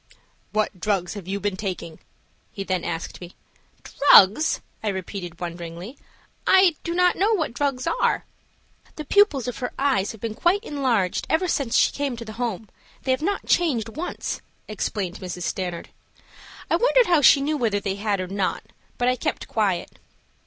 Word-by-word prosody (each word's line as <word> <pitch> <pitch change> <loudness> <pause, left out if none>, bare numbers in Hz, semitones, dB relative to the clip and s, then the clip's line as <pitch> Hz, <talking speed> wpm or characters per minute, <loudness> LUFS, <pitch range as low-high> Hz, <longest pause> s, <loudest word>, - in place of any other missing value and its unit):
"What 215 -3 -1
drugs 180 -1 -1
have 200 -4 -8
you 200 +1 -2
been 200 -1 -1
taking?" 180 -5 -5 0.5
he 195 - -5
then 185 -2 -1
asked 165 +1 -5
me. 175 0 -10 0.5
"Drugs!" 275 0 +5 0.2
I - - -2
repeated, 190 -3 -5
wonderingly. 170 +5 -7 0.5
"I 375 -3 +6
do 340 - -3
not 360 0 +4
know 420 +4 +3
what 315 - -2
drugs 270 -1 -1
are." - - +1 0.7
"The 305 - -6
pupils 305 - +3
of 250 - -4
her 245 - -3
eyes 265 -8 +1
have 220 - -12
been 225 0 -4 0.3
enlarged 250 - 0
ever 345 +4 +2
since 275 -8 0
she - - +4
came 280 -4 -3
to 230 - -7
the 215 - -8
Home. 225 -3 -3 0.4
They 265 - 0
have 260 - +1
not 395 +5 -1
changed 255 -11 +1
once," 315 +10 -4 0.3
explained 200 -3 -3
Mrs. 180 -1 -6
Stanard. 180 -1 -3 0.8
I - - +2
wondered - - +4
how 340 -6 +3
she 280 - +7
knew 295 +3 0
whether 220 -6 +1
they 195 -1 -3
had 205 -1 -1
or 185 - -3
not, 195 0 -2 0.3
but 245 - +1
I 255 - +3
kept - - -3
quiet. 200 -5 -1
220 Hz, 170 wpm, -24 LUFS, 190-285 Hz, 0.8 s, she